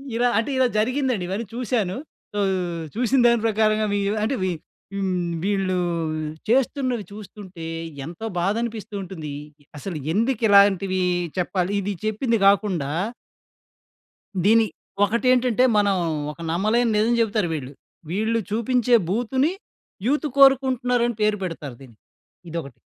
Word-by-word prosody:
ఇలా 245 +1 +3
అంటే 230 +5 0
ఇలా 260 -1 +4
జరిగిందండి 250 -3 0
ఇవన్నీ 210 +5 -2
చూసాను. 225 -6 -1 0.4
సో 205 - -2 0.6
చూసిన 250 +2 +2
దాని 235 -2 +3
ప్రకారంగా 215 0 +2
వీ 205 - +1 0.2
అంటే 260 +5 0
వీ 185 - +1 0.4
హ్మ్. 195 -1 -1 0.3
వీళ్ళు 195 -2 0 0.7
చేస్తున్నవి 255 -3 +1
చూస్తుంటే 200 -4 -10 0.4
ఎంతో 170 +6 -7
బాధనిపిస్తూ 215 +3 -2
ఉంటుంది. 160 -6 -7 0.5
అసలు 175 +1 -5 0.2
ఎందుకు 230 +3 +1
ఇలాంటివి 195 -2 +5 0.4
చెప్పాలి 180 +1 -1
ఇది 205 +2 -2
చెప్పింది 230 +2 +1
గాకుండా 195 -8 +2 1.5
దీన్ని 225 +3 +5 0.4
ఒకటేంటంటే 250 +3 +3
మనం 200 -1 +3 0.4
ఒక 150 - -15
నమ్మలేని 220 +6 +2
నిజం 225 +3 +3
జేబుతారు 215 -4 +1
వీళ్ళు. 135 -4 -5 0.4
వీళ్ళు 220 +5 0
చూపించే 240 +2 +2
బూతుని 260 - +1 0.6
యూత్ 300 +3 +1
కోరుకుంటున్నారని 250 -3 +4
పేరు 210 0 +2
పెడతారు 155 -7 -5
దీన్ని. 120 -5 -15 0.5
ఇదొకటి 155 -7 -6
215 Hz, 115 wpm, -23 LUFS, 190-240 Hz, 1.5 s, ఇలాంటివి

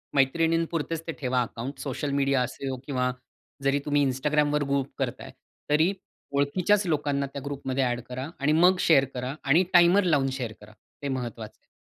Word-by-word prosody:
मैत्रिणी 165 +5 +3
पुरतेच 165 0 -2
ते 165 - -1
ठेवा 125 -1 +1
अकाउंट्स, 125 +3 -5
सोशल 140 +1 -3
मीडिया 140 -1 +2
असो 130 +1 -3
किंवा 125 -3 0 0.5
जरी 140 +1 +2
तुम्ही 145 -1 +2
Instagramवर 150 +2 +1
ग्रुप 140 -1 -1
करत - - -2
आहे. - - -9 0.4
तरी 160 +6 +3 0.4
ओळखीच्याच 180 +8 +2
लोकांना 145 -3 0
त्या 140 - -5
ग्रुपमध्ये 135 -2 -2
ॲड 120 -1 0
करा 130 +3 -5
आणि 145 +1 +2
मग 180 +4 +5
शेअर 140 -5 +5
करा 125 +2 -3
आणि 160 +7 +4
टाइमर 175 +3 +6
लावून 145 -7 +2
शेअर 125 -4 -4
करा 105 +1 -14 0.3
हे - - -1
महत्वाचं 120 -4 -5
आहे. - - -40
140 Hz, 175 wpm, -26 LUFS, 130-155 Hz, 0.5 s, टाइमर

